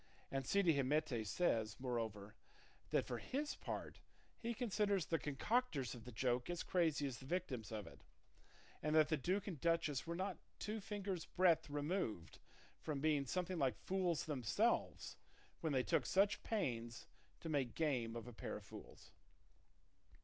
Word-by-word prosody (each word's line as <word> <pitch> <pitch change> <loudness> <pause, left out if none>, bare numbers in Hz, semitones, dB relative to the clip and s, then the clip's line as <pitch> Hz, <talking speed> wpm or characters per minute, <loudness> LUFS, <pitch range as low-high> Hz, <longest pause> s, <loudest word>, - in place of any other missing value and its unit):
And 135 -1 -1
Cide 200 -1 +3
Hamete 140 -3 +1
says, 110 - +1
moreover, 110 -5 -2 0.6
that - - +2
for 120 - -3
his 285 - -2
part - - -5 0.4
he 235 0 -2
considers 205 -5 +1
the 165 - +1
concocters 150 - 0
of 120 -2 -9
the 125 - -7
joke 125 +4 0
as 175 -1 -1
crazy 160 -5 +2
as 130 -5 -3
the 130 - -10
victims 135 - -2
of 105 -3 -3
it, - - -12 0.8
and 155 +1 +1
that 155 -1 +6
the 155 - +4
duke 185 +8 0
and 170 -9 -5
duchess 165 -4 +1
were 170 - -1
not 190 +1 -2 0.2
two 215 +1 -3
fingers' 195 -4 -3
breadth 175 -4 +4
removed 145 - -2 0.4
from 150 -3 -2
being 145 -2 +2
something 180 +1 -1
like 135 -3 +2
fools 185 -4 0
themselves 155 - +1 0.4
when 160 - 0
they 130 -2 +3
took - - +2
such 200 +1 +3
pains 120 - -2 0.3
to - - -6
make 135 -6 0
game 125 -8 +1
of 115 0 -5
a 120 - -7
pair - - -4
of - - -11
fools. - - -11
150 Hz, 160 wpm, -41 LUFS, 125-185 Hz, 0.8 s, that